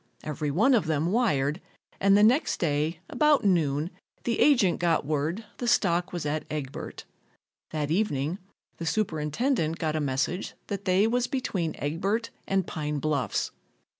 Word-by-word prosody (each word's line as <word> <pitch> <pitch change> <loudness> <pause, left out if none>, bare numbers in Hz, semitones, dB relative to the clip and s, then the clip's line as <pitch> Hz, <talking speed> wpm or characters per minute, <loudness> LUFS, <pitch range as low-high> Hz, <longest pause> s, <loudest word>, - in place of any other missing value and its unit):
Every 150 0 -3
one 215 - +3
of 215 -9 +2
them 160 +2 +1
wired 155 - +1 0.4
and 195 +1 +5
the 205 - +5
next 250 +8 +3
day 155 0 0
about 300 -6 +3
noon 160 -3 +2 0.3
the 235 - -1
agent 235 - +4
got 170 -2 +2
word 155 +8 -1
the 245 - -3
stock 180 -7 +2
was 175 -4 -4
at 150 +1 -1
Egbert. 145 -3 -5 0.6
That 150 -1 -2
evening 165 -3 0 0.4
the 165 - -4
superintendent 165 - 0
got 160 -3 -1
a 155 - 0
message 145 +7 -1
that 200 0 -4
they 190 +2 +4
was 245 +2 +1
between 210 - -2
Egbert 195 +10 -1 0.2
and 195 -2 +1
Pine 150 -1 -3
Bluffs. 145 -2 -1
170 Hz, 150 wpm, -27 LUFS, 150-210 Hz, 0.6 s, and